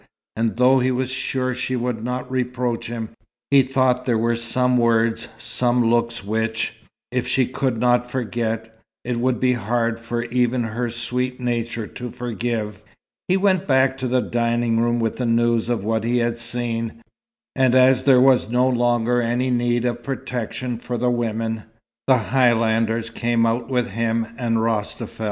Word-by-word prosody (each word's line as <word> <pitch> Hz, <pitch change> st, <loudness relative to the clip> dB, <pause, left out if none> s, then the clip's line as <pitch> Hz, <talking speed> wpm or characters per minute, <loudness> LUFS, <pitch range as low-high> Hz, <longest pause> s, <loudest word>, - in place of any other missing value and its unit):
And 115 Hz, 0 st, -1 dB
though 130 Hz, +2 st, +5 dB
he 130 Hz, +1 st, +1 dB
was 130 Hz, 0 st, -1 dB
sure 130 Hz, 0 st, -1 dB
she 130 Hz, +1 st, -2 dB
would 120 Hz, -2 st, -2 dB
not 125 Hz, +1 st, -4 dB
reproach 125 Hz, -2 st, -2 dB
him, 115 Hz, -1 st, -5 dB, 0.4 s
he 140 Hz, -1 st, +7 dB
thought 130 Hz, -1 st, +1 dB
there 120 Hz, -3 st, +2 dB
were 115 Hz, +1 st, +1 dB
some 125 Hz, +2 st, +2 dB
words, 115 Hz, 0 st, +2 dB
some 120 Hz, 0 st, +1 dB
looks 115 Hz, -2 st, 0 dB
which, 110 Hz, +1 st, -1 dB, 0.4 s
if 125 Hz, -1 st, -1 dB
she 130 Hz, -, +2 dB
could 130 Hz, -1 st, -2 dB
not 125 Hz, 0 st, +2 dB
forget, 115 Hz, -2 st, -3 dB, 0.3 s
it 120 Hz, -1 st, -2 dB
would 125 Hz, 0 st, 0 dB
be 130 Hz, 0 st, +3 dB
hard 115 Hz, 0 st, -1 dB
for 120 Hz, 0 st, -3 dB
even 120 Hz, 0 st, 0 dB
her 115 Hz, +2 st, -2 dB
sweet 125 Hz, +2 st, -3 dB
nature 115 Hz, -2 st, -2 dB
to 125 Hz, +3 st, -7 dB
forgive. 115 Hz, -3 st, -4 dB, 0.5 s
He 185 Hz, -, +3 dB
went 190 Hz, -2 st, +1 dB
back 130 Hz, -1 st, +3 dB
to 130 Hz, -, -2 dB
the 125 Hz, +1 st, +2 dB
dining 115 Hz, -1 st, 0 dB
room 120 Hz, +1 st, +1 dB
with 115 Hz, -1 st, -1 dB
the 125 Hz, -, -1 dB
news 115 Hz, 0 st, +2 dB
of 120 Hz, -5 st, -1 dB
what 110 Hz, 0 st, 0 dB
he 120 Hz, +2 st, +1 dB
had 120 Hz, -1 st, 0 dB
seen. 115 Hz, -1 st, -3 dB, 0.5 s
And 130 Hz, -2 st, +3 dB
as 130 Hz, 0 st, +5 dB
there 135 Hz, -3 st, +6 dB
was 130 Hz, -4 st, +4 dB
no 125 Hz, +2 st, +2 dB
longer 120 Hz, -1 st, +2 dB
any 120 Hz, +2 st, 0 dB
need 120 Hz, 0 st, +1 dB
of 120 Hz, -1 st, -2 dB
protection 125 Hz, -1 st, -4 dB
for 120 Hz, 0 st, -4 dB
the 125 Hz, +1 st, +1 dB
women, 115 Hz, -2 st, -2 dB, 0.4 s
the 130 Hz, -1 st, +5 dB
Highlanders 115 Hz, -2 st, +1 dB
came 115 Hz, 0 st, +1 dB
out 115 Hz, +2 st, -1 dB
with 125 Hz, -2 st, 0 dB
him 115 Hz, +2 st, -1 dB
and 115 Hz, -2 st, 0 dB
Rostafel. 110 Hz, 0 st, -2 dB
120 Hz, 170 wpm, -22 LUFS, 115-125 Hz, 0.5 s, he